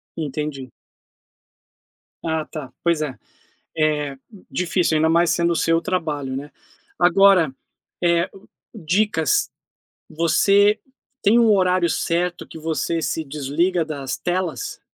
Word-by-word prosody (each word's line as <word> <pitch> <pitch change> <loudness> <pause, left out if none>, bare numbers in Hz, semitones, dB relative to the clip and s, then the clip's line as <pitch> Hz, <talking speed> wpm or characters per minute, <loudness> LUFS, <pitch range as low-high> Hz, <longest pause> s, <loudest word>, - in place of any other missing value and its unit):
Entendi. 150 -3 -4 1.5
Ah, 160 -1 -1
tá, 150 -6 -8
pois 170 -2 +2
é. 145 -4 -3 0.6
Eh, 150 -3 0 0.3
difícil, 180 -2 +1
ainda 160 +1 +3
mais 170 +1 +3
sendo 170 0 +1
o - - -3
seu 165 0 +2
trabalho, 155 -8 -2
né. 145 +2 -6 0.5
Agora, 180 -4 +5 0.5
eh, 170 0 +2 0.4
dicas, 180 - +1 0.6
você 200 +6 +3 0.4
tem 215 +4 +5
um 230 -2 +5
horário 185 -3 +3
certo 175 +2 -1
que - - -11
você 165 +1 -1
se 160 +2 -2
desliga 155 +5 0
das 140 -4 -4
telas? 185 - -3
165 Hz, 110 wpm, -22 LUFS, 155-180 Hz, 1.5 s, Agora